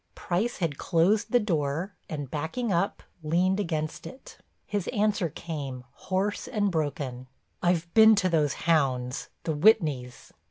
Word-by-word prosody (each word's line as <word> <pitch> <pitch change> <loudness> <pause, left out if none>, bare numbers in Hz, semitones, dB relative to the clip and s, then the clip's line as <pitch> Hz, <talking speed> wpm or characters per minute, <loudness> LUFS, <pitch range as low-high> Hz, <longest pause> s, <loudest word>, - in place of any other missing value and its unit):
Price 200 +7 -1
had 160 -6 -2
closed 190 +5 +2
the 245 - +5
door 165 -2 -1 0.2
and 145 -4 -5
backing 175 +9 -2
up, 175 +4 0 0.2
leaned 180 +5 +1
against 155 -5 -3
it. 265 - -12 0.3
His 205 -3 -3
answer 210 -5 +1
came, 140 -6 -6
hoarse 195 +7 -2
and 205 -2 0
broken: 145 -6 -3 0.3
"I've 175 -1 0
been 220 0 +8
to 200 -2 +2
those 155 -5 +2
hounds, 130 -6 +1
the 160 - -1
Whitneys." 150 - +2
170 Hz, 135 wpm, -27 LUFS, 145-200 Hz, 0.3 s, been